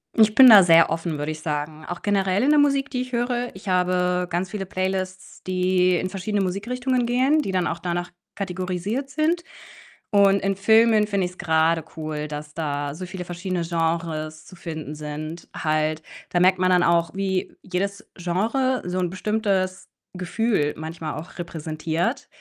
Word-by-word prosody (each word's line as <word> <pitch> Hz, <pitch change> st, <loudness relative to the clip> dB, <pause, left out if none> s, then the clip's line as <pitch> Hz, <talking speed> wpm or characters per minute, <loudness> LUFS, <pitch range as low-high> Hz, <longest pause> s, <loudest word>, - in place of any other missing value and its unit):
Ich 215 Hz, -1 st, +5 dB
bin 260 Hz, 0 st, +9 dB
da 205 Hz, -4 st, +10 dB
sehr 165 Hz, -1 st, +6 dB
offen, 165 Hz, -1 st, -2 dB
würde 150 Hz, +1 st, -2 dB
ich 155 Hz, 0 st, -7 dB
sagen. 155 Hz, 0 st, -4 dB
Auch 175 Hz, -, -6 dB
generell 195 Hz, -1 st, +1 dB
in 285 Hz, -, +3 dB
der 300 Hz, -1 st, +5 dB
Musik, 280 Hz, -1 st, +2 dB
die 250 Hz, -2 st, -2 dB
ich 255 Hz, 0 st, -6 dB
höre. 245 Hz, 0 st, -1 dB
Ich 195 Hz, +1 st, -12 dB
habe 180 Hz, 0 st, +1 dB
ganz 175 Hz, +2 st, -2 dB
viele 200 Hz, -3 st, -4 dB
Playlists, 185 Hz, 0 st, -4 dB
die 185 Hz, 0 st, +2 dB
in 185 Hz, -, -2 dB
verschiedene 200 Hz, +1 st, -2 dB
Musikrichtungen 245 Hz, +6 st, -1 dB
gehen, 260 Hz, +6 st, +3 dB
die 195 Hz, -, -3 dB
dann 180 Hz, -2 st, +1 dB
auch 165 Hz, -, -2 dB
danach 175 Hz, 0 st, -3 dB, 0.2 s
kategorisiert 190 Hz, +7 st, -3 dB
sind. 320 Hz, +3 st, 0 dB, 0.7 s
Und 200 Hz, -1 st, +5 dB
in 195 Hz, 0 st, -1 dB
Filmen 220 Hz, +1 st, +4 dB
finde 195 Hz, -3 st, 0 dB
ich's 180 Hz, -, -13 dB
grade 160 Hz, -2 st, +2 dB
cool, 155 Hz, -1 st, -4 dB
dass 150 Hz, 0 st, -7 dB
da 145 Hz, -2 st, -3 dB
so 185 Hz, +2 st, -6 dB
viele 180 Hz, 0 st, -6 dB
verschiedene 175 Hz, 0 st, -3 dB
Genres 165 Hz, -2 st, -2 dB
zu 185 Hz, -, -13 dB
finden 155 Hz, -3 st, -6 dB
sind 155 Hz, +2 st, -7 dB
halt. 155 Hz, 0 st, 0 dB, 0.3 s
Da 175 Hz, -, +1 dB
merkt 185 Hz, +1 st, +5 dB
man 185 Hz, 0 st, +3 dB
dann 180 Hz, -1 st, +5 dB
auch, 170 Hz, 0 st, +2 dB
wie 190 Hz, -1 st, -2 dB
jedes 200 Hz, +2 st, -4 dB
Genre 225 Hz, +9 st, 0 dB
so 180 Hz, +1 st, -3 dB
'n 180 Hz, -1 st, 0 dB
bestimmtes 195 Hz, -2 st, -1 dB, 0.3 s
Gefühl 180 Hz, -3 st, 0 dB
manchmal 160 Hz, 0 st, -5 dB
auch 165 Hz, +4 st, -9 dB
repräsentiert 165 Hz, -, -3 dB
185 Hz, 170 wpm, -23 LUFS, 165-205 Hz, 0.7 s, da